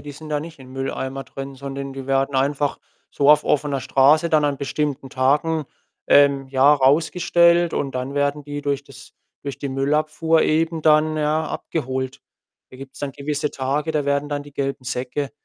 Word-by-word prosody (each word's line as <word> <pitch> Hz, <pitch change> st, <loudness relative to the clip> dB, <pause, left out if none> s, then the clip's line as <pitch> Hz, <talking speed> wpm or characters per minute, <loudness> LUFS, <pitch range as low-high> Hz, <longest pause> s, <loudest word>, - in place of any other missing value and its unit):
die 145 Hz, -, -9 dB
sind 155 Hz, +2 st, -11 dB
da 150 Hz, -1 st, 0 dB
nicht 160 Hz, 0 st, -10 dB
im 130 Hz, -1 st, -13 dB
Mülleimer 135 Hz, 0 st, -4 dB
drin, 135 Hz, 0 st, -8 dB
sondern 140 Hz, 0 st, -6 dB
die 135 Hz, -1 st, -8 dB
werden 135 Hz, +1 st, 0 dB
einfach 140 Hz, +2 st, 0 dB, 0.3 s
so 140 Hz, 0 st, +1 dB
auf 150 Hz, 0 st, +5 dB
offener 145 Hz, -2 st, 0 dB
Straße 155 Hz, +5 st, +4 dB
dann 155 Hz, -2 st, +3 dB
an 145 Hz, -1 st, 0 dB
bestimmten 140 Hz, 0 st, -3 dB
Tagen, 150 Hz, +4 st, +1 dB, 0.4 s
ähm, 140 Hz, -1 st, +4 dB
ja, 135 Hz, +2 st, +5 dB
rausgestellt 170 Hz, +4 st, +3 dB
und 135 Hz, -2 st, -2 dB
dann 130 Hz, +2 st, -4 dB
werden 145 Hz, +1 st, 0 dB
die 145 Hz, 0 st, -6 dB
durch 140 Hz, -1 st, -2 dB
das -, -, -14 dB, 0.3 s
durch 140 Hz, -1 st, -6 dB
die 140 Hz, -, -4 dB
Müllabfuhr 155 Hz, +4 st, +1 dB
eben 160 Hz, +1 st, +1 dB
dann, 155 Hz, 0 st, +4 dB
ja, 155 Hz, +1 st, 0 dB
abgeholt. 130 Hz, -4 st, -4 dB, 0.5 s
Da 130 Hz, -, -12 dB
gibt's 135 Hz, 0 st, -11 dB
dann 145 Hz, -, -3 dB
gewisse 150 Hz, +1 st, -3 dB
Tage, 140 Hz, +4 st, -2 dB
da 150 Hz, -2 st, -1 dB
werden 140 Hz, +1 st, 0 dB
dann 145 Hz, 0 st, -2 dB
die 145 Hz, -, -14 dB
gelben 135 Hz, -2 st, -3 dB
Säcke 130 Hz, +2 st, -3 dB
145 Hz, 180 wpm, -22 LUFS, 135-150 Hz, 0.5 s, auf